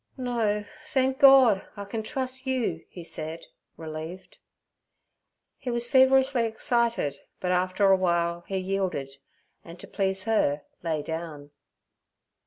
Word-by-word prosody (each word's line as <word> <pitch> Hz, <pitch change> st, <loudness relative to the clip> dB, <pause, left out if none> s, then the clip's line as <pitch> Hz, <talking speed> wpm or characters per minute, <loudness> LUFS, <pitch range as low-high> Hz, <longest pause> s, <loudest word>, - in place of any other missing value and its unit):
'No, 225 Hz, -5 st, -1 dB, 0.3 s
thenk 265 Hz, 0 st, +1 dB
Gord, 265 Hz, -8 st, +7 dB, 0.2 s
I 200 Hz, -, -5 dB
can 220 Hz, +2 st, -4 dB
trus' 260 Hz, +3 st, -5 dB
you' 230 Hz, -11 st, -1 dB
he 175 Hz, -, -9 dB
said, 160 Hz, 0 st, -5 dB, 0.3 s
relieved. 160 Hz, +3 st, -8 dB, 1.2 s
He 255 Hz, -, -5 dB
was 240 Hz, 0 st, -1 dB
feverishly 265 Hz, -1 st, +4 dB
excited, 230 Hz, -, 0 dB, 0.2 s
but 180 Hz, -, -1 dB
after 185 Hz, +2 st, +2 dB
a -, -, +7 dB
while 170 Hz, -1 st, 0 dB
he 195 Hz, -, -2 dB
yielded, 185 Hz, -8 st, -2 dB, 0.5 s
and 170 Hz, +1 st, -12 dB
to -, -, -9 dB
please 190 Hz, -1 st, -1 dB
her 150 Hz, -10 st, +1 dB, 0.2 s
lay 160 Hz, -3 st, -2 dB
down. 160 Hz, -3 st, -6 dB
195 Hz, 125 wpm, -27 LUFS, 170-240 Hz, 1.2 s, Gord